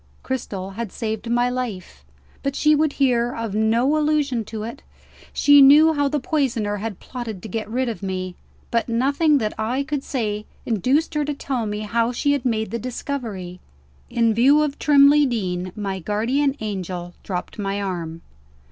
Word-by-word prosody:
Cristel 195 -7 -4
had 215 0 -5
saved 220 0 -4
my 240 +1 +2
life 250 -7 -5 0.4
but 275 0 -2
she 305 0 +4
would 300 -1 +2
hear 245 -3 +1
of 230 -3 -4
no 230 +7 +2
allusion 295 -6 +1
to 215 0 -6
it. 235 +6 -7 0.5
She 285 -1 +6
knew 300 +4 +7
how 285 -1 +1
the 295 +1 0
poisoner 250 -8 -1
had 210 -1 -5
plotted 230 -7 -7
to - - -6
get 220 -1 -4
rid 255 +3 -1
of 230 -3 -4
me 185 -1 -3 0.4
but 230 0 0
nothing 280 +6 +3
that 215 -5 -1
I 245 +6 0
could 290 -1 -3
say 215 -5 -3 0.2
induced 260 - +1
her 300 -1 +1
to 295 0 -2
tell 255 -5 -2
me 210 0 -3
how 230 +2 0
she 285 +4 0
had 285 -3 0
made 220 -3 0
the 235 - -2
discovery. 225 -7 -5 0.5
In 230 -1 +2
view 275 +7 +5
of 290 -2 -3
Trimley 290 0 +6
Deen, 185 -6 -2
my 195 -2 -3
guardian 245 - 0
angel 185 -4 -4
dropped 180 +3 -5
my 200 0 -2
arm. 170 -4 -4
235 Hz, 175 wpm, -22 LUFS, 210-275 Hz, 0.5 s, knew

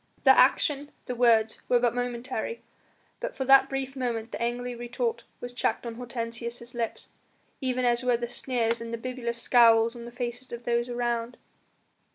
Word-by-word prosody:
The - - +8
action, 290 -1 +3 0.2
the 250 - -3
words, 230 -3 +3
were 245 - +5
but 240 -1 +2
momentary, 245 - -3 0.6
but - - -4
for 265 - -2
that 270 0 +7
brief 270 0 -3
moment 235 -3 -3
the - - -5
angry 245 +1 -2
retort 240 - -3
was 245 0 -7
checked 245 - -1
on 235 - -4
Hortensius' 235 0 -5
lips, 235 -2 -4 0.5
even 255 -1 0
as 240 0 +3
were 250 -1 +3
the 240 0 -3
sneers 235 -2 -1
and 230 0 -6
the 230 - -2
bibulous 235 -1 -4
scowls 230 -1 +5
on 235 -1 -8
the 240 - -8
faces 245 +1 -5
of 235 0 -6
those 235 0 0
around. 240 0 -2
240 Hz, 175 wpm, -27 LUFS, 235-250 Hz, 0.6 s, The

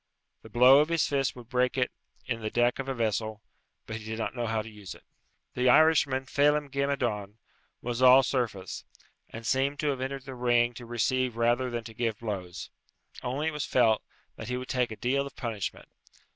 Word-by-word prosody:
The 110 - -13
blow 125 +5 +7
of 150 +2 +2
his 165 -2 +2
fist 135 -2 0
would 120 -2 -11
break 125 +1 0
in 115 - -4
the 110 - -2
deck 120 +3 +1
of 135 0 -4
a - - 0
vessel, 110 -1 -2 0.4
but 110 - -5
he 110 - -10
did 110 0 -4
not 115 - -3
know 120 -1 -2
how 110 -1 -1
to - - -11
use 105 -4 -9
it. - - -18 0.5
The 125 0 +2
Irishman, 140 -2 +4
Phelem 145 +1 +2
ghe 140 0 0
Madone, 110 -7 -2 0.5
was 120 +1 -3
all 130 +1 +8
surface, 110 -10 -2 0.5
and 115 0 -9
seemed 135 +3 +1
to 150 - +1
have 135 -2 -2
entered 135 0 -4
the 135 - -7
ring 120 -1 +2
to 120 0 -10
receive 120 +1 0
rather 120 +2 +2
than 120 -1 -4
to 115 0 -10
give 115 -2 -2
blows. 100 -6 -6 0.5
Only 140 +5 -1
it - - -7
was 150 -1 -3
felt 115 -4 +3 0.4
that 110 - -7
he 125 - -1
would 125 0 -7
take 125 -1 +1
a 110 - -6
deal 140 +5 0
of 140 - -13
punishment. 115 -6 -5
125 Hz, 205 wpm, -28 LUFS, 110-135 Hz, 0.5 s, all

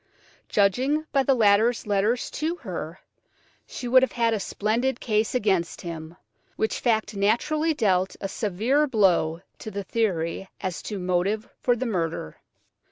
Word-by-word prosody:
Judging 255 +10 +2
by 275 - +3
the 270 0 +3
latter's 220 +1 +3
letters 210 +4 0
to 320 +3 -2
her, - - -6 0.7
she 245 - -6
would 255 +2 +6
have 260 - 0
had 230 -1 +2
a 215 - 0
splendid 230 +6 -1
case 215 +1 0
against 190 -7 0
him, 165 0 -7 0.4
which 220 - -1
fact 220 -3 0
naturally 300 +11 +1
dealt 190 -6 +1
a 195 - -3
severe 225 +10 +1
blow 180 - +2 0.2
to - - -6
the 200 -1 -4
theory 190 -4 -1
as 185 -2 -4
to 210 - -5
motive 185 +4 0
for 245 - +2
the 250 +2 -3
murder. 165 - -2
215 Hz, 150 wpm, -25 LUFS, 190-245 Hz, 0.7 s, would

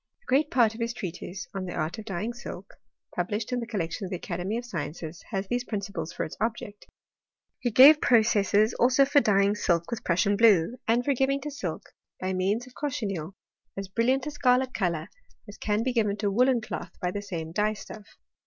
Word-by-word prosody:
A - - -33
great 285 +4 +2
part 235 -8 +3
of 225 - -8
his 230 +1 -2
treatise 180 +1 -6
on 195 -1 -4
the 180 - -5
art 160 +7 -2
of 215 - -8
dyeing 205 +4 -3
silk, 200 -5 -9 0.4
published 210 +6 -2
in 250 - 0
the 230 - -5
collection 195 -4 -3
of 190 - -4
the 185 - -3
Academy 180 +6 -3
of 240 - -5
Sciences, 165 -4 -6
has 195 0 -3
these 245 +2 -1
principles 200 -7 -4
for - - -3
its - - -6
object. 215 -2 -3 0.7
He 245 - 0
gave 275 +7 +8
processes 215 -2 +3
also 255 +3 +4
for 285 +1 +4
dyeing 200 -2 +3
silk 170 -5 0
with 235 - -4
Prussian 185 +4 +2
blue, 220 0 +4
and 235 +2 +2
for 280 - +3
giving 270 +2 +1
to 295 +2 -5
silk, 185 - -5 0.4
by 185 0 -2
means 195 +6 0
of 255 - -16
cochineal, 195 - -3 0.4
as 195 -1 -5
brilliant 250 +6 +1
a 300 - -3
scarlet 255 -2 +2
colour 170 -6 -1 0.4
as 205 - -11
can 210 +1 0
be 255 0 0
given 210 -4 +1
to 205 -1 0
woollen 250 +3 +3
cloth 215 - -6
by 180 -2 -1
the 205 - -4
same 165 -5 -5
dye 210 +4 +1
stuff. 210 0 -10
210 Hz, 205 wpm, -27 LUFS, 185-245 Hz, 0.7 s, gave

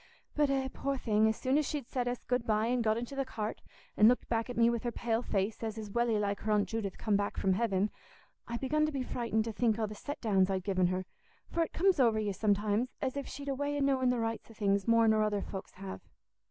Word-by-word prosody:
But 295 -1 +3
eh, 270 -1 +1
poor 275 0 -2
thing, 220 -3 +2
as 220 - 0
soon 265 +3 +2
as 300 - -1
she'd 285 -5 -3
said 250 -2 -2
us 245 0 -3
'good 250 -1 0
bye' 215 0 +2
an' 245 +1 +1
got 220 -1 +2
into 240 +4 -5
the 275 - 0
cart, 220 -4 -5 0.3
an' 215 - +7
looked 250 +2 +3
back 230 +1 -1
at 245 - -5
me 230 0 +5
with 235 -1 +1
her 240 - -2
pale 230 -1 -1
face, 205 -2 -1
as 220 -1 -3
is 215 -2 -6
welly 235 0 +2
like 200 -1 -1
her 215 - -2
Aunt 210 -1 +3
Judith 215 -4 -3
come 215 -2 +1
back 205 0 -1
from 190 - +2
heaven, 200 -1 +1 0.6
I 235 - -3
begun 305 +4 +1
to - - -2
be 270 -3 -2
frightened 230 -3 -1
to 225 - -3
think 225 0 +1
o' 225 - 0
the 210 - -6
set 285 +8 -6
downs 195 -4 +2
I'd 190 -1 -1
given 185 -2 +2
her; 185 +1 -2 0.5
for 335 - 0
it 330 - 0
comes 375 -2 +2
over 230 -4 +4
you 210 -2 -1
sometimes 210 +3 +1
as 265 -1 -2
if 280 -1 -4
she'd 285 0 -8
a - - +1
way 285 +2 -2
o' - - -1
knowing 270 -2 +2
the 250 - +1
rights 225 0 -3
o' 225 - -14
things 200 -1 +1
more 230 -1 +5
nor 220 0 +4
other 210 -2 0
folks 190 -1 -7
have. 190 0 -7
225 Hz, 265 wpm, -32 LUFS, 210-255 Hz, 0.6 s, an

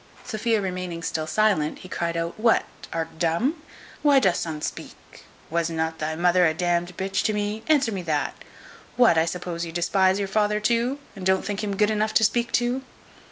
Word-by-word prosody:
Sophia 220 0 0
remaining 180 -3 -4
still 155 -1 -2
silent, 195 -6 +1
he - - -11
cryed 170 -2 -2
out, 165 0 -2
"What, 230 +1 +3 0.3
art 165 -1 -4
dumb? 225 - 0 0.4
why 290 -2 +5
dost 190 -8 +2
unt 155 -2 -5
speak? - - -8 0.3
Was 170 0 0
not 160 0 -2
thy 155 +1 -2
mother 175 +2 +3
a 160 - 0
d 175 - -2 0.2
d 180 - -12
b 190 - -2
to 205 +2 0
me? 210 +1 -2
answer 280 -7 +3
me 195 -3 -3
that. 150 -5 -1 0.6
What, 240 -7 +5
I 160 0 +3
suppose 175 0 -4
you 165 - -5
despise 185 +2 +2
your 200 -1 -1
father 210 +1 +1
too, 235 +5 +1 0.2
and 195 - -8
don't 190 0 +2
think 205 +1 -3
him 200 -1 -2
good 210 +1 +3
enough 215 0 0
to 220 - +5
speak 235 +2 +1
to?" 245 +2 +1
190 Hz, 200 wpm, -24 LUFS, 170-215 Hz, 0.6 s, why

